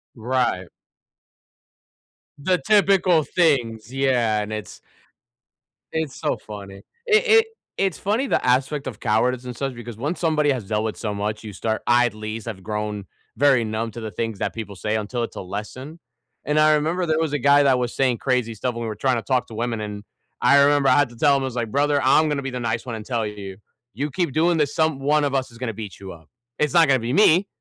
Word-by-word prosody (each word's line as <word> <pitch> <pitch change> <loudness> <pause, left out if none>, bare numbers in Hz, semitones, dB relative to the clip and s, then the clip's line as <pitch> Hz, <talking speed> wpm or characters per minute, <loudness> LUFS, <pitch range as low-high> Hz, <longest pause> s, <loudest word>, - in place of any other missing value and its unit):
Right. 120 -6 -1 1.7
The 180 +5 +1
typical 195 -6 +3
things, 120 - 0
yeah. 120 -6 +1
And 105 +1 -5
it's 110 -1 -7 1.1
It's 160 -4 -3
so - - -1
funny. 100 -2 -10 0.2
It 440 +1 +3
it 445 +1 +6 0.3
it's 195 -4 0
funny, 225 +7 -1
the - - 0
aspect 135 +3 +1
of 120 - -6
cowardice 125 +4 +1
and 125 -1 -6
such, 135 -2 -2
because 120 -2 -9
once 145 +8 -3
somebody 150 -3 +2
has 125 -5 -2
dealt 105 +1 -1
with 110 - -3
so 105 -3 -3
much, 105 +2 -3
you 105 -2 -8
start 110 +2 -2
I 120 +1 +5
at 120 - -2
least 110 0 -6
have 95 -5 -7
grown 105 -2 -4 0.3
very 135 -2 +4
numb 110 +1 -3
to 115 - -8
the 110 -1 -5
things 115 +1 -4
that - - -2
people 105 -3 -7
say 105 +3 -2
until 115 +3 -2
it's - - -6
a - - -5
lesson. 110 - -7 0.5
And 150 +1 +1
I 155 0 +5
remember 165 +4 0
there 160 0 +1
was 160 -2 -1
a 145 - 0
guy 140 +2 +5
that 130 -2 +3
was 120 -1 -3
saying 130 -3 +1
crazy 125 -4 0
stuff 120 +3 -3
when 120 - -5
we - - -3
were 110 - -4
trying 130 +4 +1
to 115 - -2
talk 130 -2 0
to 110 - -10
women. 115 -1 -2
And 105 -1 -6 0.4
I 140 0 +6
remember 145 -1 +4
I 130 - +5
had 145 -4 +3
to 120 - -14
tell 140 +4 +4
him, 135 - 0
I - - -1
was 125 -2 -5
like, 115 -3 -2
"Brother, 145 0 +2
I'm 155 +4 +4
gonna 145 -1 -1
be 135 - -4
the 125 - -4
nice 115 +1 -2
one 120 -3 -4
and 110 -1 -8
tell 115 -4 -1
you, 100 -2 -7 0.4
you 145 +2 -3
keep 170 -3 -1
doing 165 +1 +2
this, 145 -2 0
some 160 -4 +1
one 150 +2 +2
of 140 -1 0
us 130 -2 -1
is 115 - -14
gonna 120 -3 -4
beat 105 -3 -8
you 95 -1 -8
up. 80 -2 -17 0.3
It's 150 +2 +1
not 165 -3 +6
gonna 130 -2 +3
be 120 +3 -3
me. 190 0 +5
125 Hz, 230 wpm, -22 LUFS, 110-145 Hz, 1.7 s, it